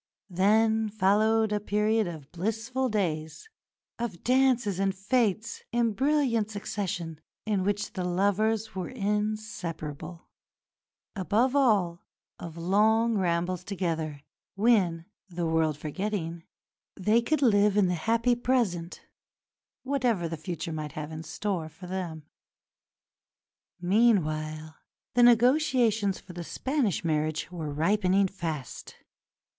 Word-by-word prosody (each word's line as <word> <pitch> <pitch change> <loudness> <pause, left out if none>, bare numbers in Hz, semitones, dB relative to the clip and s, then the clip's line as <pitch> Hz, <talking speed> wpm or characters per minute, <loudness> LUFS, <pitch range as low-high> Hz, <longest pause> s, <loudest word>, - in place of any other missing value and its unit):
Then 220 +4 +3
followed 215 +2 +2
a 210 - +1
period 210 +1 +1
of 155 -5 -8
blissful 225 +8 -2
days, 165 - -2 0.5
of 225 -8 -4
dances 250 -6 +2
and 195 0 +1
fêtes, 215 +2 0
in 235 -2 +1
brilliant 265 -4 +1
succession, 185 -6 -4 0.2
in 205 -3 0
which 205 +1 -1
the 185 - -3
lovers 205 +4 +1
were 185 -2 -4
inseparable; 205 - -4 0.9
above 220 +7 +1
all, 200 -11 +2 0.4
of 170 -1 -8
long 220 +6 +3
rambles 175 0 0
together, 165 -7 -3 0.3
when, 195 -6 +2 0.2
"the 175 -1 -3
world 160 -2 +1
forgetting," 170 +1 -4 0.5
they 215 +5 +3
could 290 +4 0
live 205 -3 +4
in 205 - +5
the 180 - 0
happy 230 +8 +1
present, 230 -9 -1 0.8
whatever 245 -10 0
the 165 - -4
future 165 0 -5
might 150 -2 -5
have 155 0 -6
in 155 0 -6
store 170 0 -3
for 165 +4 -12
them. 175 -4 -5 1.5
Meanwhile 155 -6 +1 0.4
the 245 - +3
negotiations 240 -4 +4
for 180 - -13
the 175 0 -6
Spanish 260 - -1
marriage 155 +1 -1
were 165 -4 -5
ripening 190 +5 +2
fast. 160 -9 -6
195 Hz, 115 wpm, -28 LUFS, 170-225 Hz, 1.5 s, in